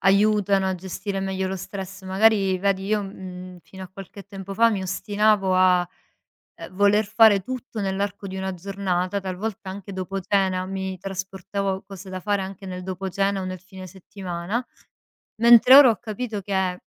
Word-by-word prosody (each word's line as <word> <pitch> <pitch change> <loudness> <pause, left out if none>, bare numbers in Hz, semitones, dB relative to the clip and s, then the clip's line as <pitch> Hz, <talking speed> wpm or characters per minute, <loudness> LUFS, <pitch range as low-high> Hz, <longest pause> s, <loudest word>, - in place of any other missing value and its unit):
aiutano 200 0 +3
a 190 - -1
gestire 190 +2 -5
meglio 190 -1 -2
lo 190 - -3
stress. 190 +1 -7
Magari 195 -1 +3
vedi, 195 0 0
io, 210 0 +1
mhmm, 185 -2 -9
fino 190 -1 -12
a 185 - -8
qualche 195 +1 -11
tempo 195 0 -8
fa 230 +3 +4
mi 195 -3 -2
ostinavo 205 0 +1
a, 185 -1 +4 0.7
ehm, - - -9
voler 205 +2 +4
fare 215 -2 +5
tutto 250 -1 -6
nell'arco 200 +1 -3
di 190 0 -6
una 190 0 -3
giornata, 190 0 -2
talvolta 190 +1 -5
anche 200 +1 -8
dopo 190 +1 -4
cena 185 -1 +1
mi 190 0 -4
trasportavo 195 +1 -4
cose 195 -1 -10
da 185 0 -5
fare 205 0 0
anche 195 0 -7
nel 180 -1 -6
dopo 190 +1 -4
cena 195 +1 0
o - - -4
nel 185 -1 -5
fine 185 0 -11
settimana; 190 +4 -5 0.7
mentre 235 +2 +8
ora 280 -2 +10
ho 225 - +1
capito 220 -2 -5
che 190 -2 -1
195 Hz, 170 wpm, -24 LUFS, 185-200 Hz, 0.7 s, ora